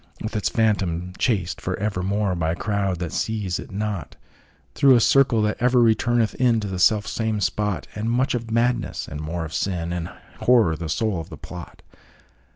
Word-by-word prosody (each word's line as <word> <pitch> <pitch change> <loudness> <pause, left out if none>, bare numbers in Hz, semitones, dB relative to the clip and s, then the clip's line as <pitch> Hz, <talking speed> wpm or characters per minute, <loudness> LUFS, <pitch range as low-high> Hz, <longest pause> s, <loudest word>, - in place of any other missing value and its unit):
With 110 +1 -4
its 105 - 0
Phantom 90 -6 0
chased 100 -9 0
for 90 - -2
evermore, 100 0 -1
By 80 -2 0
a - - -3
crowd 100 -2 -1
that 85 -2 -4
seize 105 -5 -2
it - - -8
not, 100 -6 -4 0.6
Through 135 -2 +5
a - - +5
circle 125 -2 +4
that 105 0 0
ever 125 +1 +3
returneth 115 0 +2
inTo 115 -4 +2
the 95 - -3
self 105 +3 +4
same 110 -2 -1
spot, 100 0 -1
And 110 +2 -3
much 125 +3 +1
of 115 -2 -3
Madness, 115 +1 0
and 75 +2 -6
more 80 +2 -3
of 80 - -8
Sin, 85 -3 -2
And 85 -1 -3 0.3
Horror 115 -10 +4
the 80 0 -5
soul 105 +1 0
of 80 - -11
the - - -9
plot. 90 -1 -10
105 Hz, 185 wpm, -23 LUFS, 90-115 Hz, 0.6 s, Through